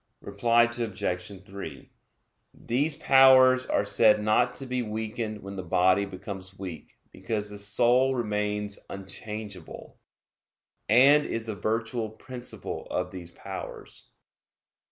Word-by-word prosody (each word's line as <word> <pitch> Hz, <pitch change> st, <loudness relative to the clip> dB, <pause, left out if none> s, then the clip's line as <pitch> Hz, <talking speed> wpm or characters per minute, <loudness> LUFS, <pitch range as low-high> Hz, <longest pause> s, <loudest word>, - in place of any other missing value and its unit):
Reply 115 Hz, +4 st, +3 dB
Obj. 100 Hz, -5 st, -3 dB
3: 95 Hz, -8 st, -9 dB, 0.6 s
These 140 Hz, +6 st, -1 dB
powers 130 Hz, -2 st, +6 dB
are -, -, +1 dB
said 105 Hz, -2 st, +5 dB
not 110 Hz, +4 st, +2 dB
to 135 Hz, -, -7 dB
be 125 Hz, -1 st, -2 dB
weakened 110 Hz, -1 st, -4 dB
when 100 Hz, 0 st, -7 dB
the 95 Hz, -, -4 dB
body 95 Hz, +3 st, +2 dB
becomes 95 Hz, -1 st, -8 dB
weak, 90 Hz, -6 st, -9 dB
because 105 Hz, +1 st, -4 dB
the 105 Hz, -, -8 dB
soul 120 Hz, +6 st, +3 dB
remains 105 Hz, -3 st, -2 dB
unchangeable, 100 Hz, -1 st, -8 dB, 0.9 s
and 135 Hz, +6 st, +6 dB
is 115 Hz, -1 st, -3 dB
the 110 Hz, -2 st, -4 dB
virtual 110 Hz, +3 st, -2 dB
principle 125 Hz, +3 st, -7 dB
of 90 Hz, 0 st, -2 dB
these 90 Hz, -2 st, -8 dB
powers. -, -, -9 dB
105 Hz, 115 wpm, -27 LUFS, 100-120 Hz, 0.9 s, powers